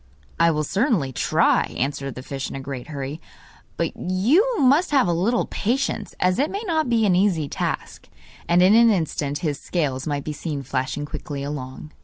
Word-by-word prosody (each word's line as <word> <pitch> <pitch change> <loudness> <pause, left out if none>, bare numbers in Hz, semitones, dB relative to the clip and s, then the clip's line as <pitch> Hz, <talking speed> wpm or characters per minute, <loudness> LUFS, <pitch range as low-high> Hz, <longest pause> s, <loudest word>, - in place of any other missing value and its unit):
'I 170 0 +5
will 155 -2 0
certainly 190 - 0
try,' - - +2
answered 135 0 -2
the 130 - -7
fish 135 -1 -5
in - - -7
a - - -4
great 135 -2 -6
hurry; 145 +1 -5 0.6
'but - - -1
you 290 - +2
must 285 +7 +4
have 275 -9 +3
a 175 - +2
little 210 +9 +1
patience, 260 +6 -2
as 180 +3 +2
it 290 +3 +2
may 405 +3 -4
not 315 - 0
be 230 -2 +3
an 190 -3 +3
easy 180 -6 +2
task.' - - -4 0.4
And 175 +1 +5
in 190 +3 +6
an 230 +1 +7
instant 155 -7 0
his 150 -2 -1
scales 140 -4 -2
might 145 -2 -2
be 155 - -4
seen 150 -2 -4
flashing 130 +3 -2
quickly 145 -1 -6
along. 140 0 -6
165 Hz, 190 wpm, -23 LUFS, 140-225 Hz, 0.6 s, an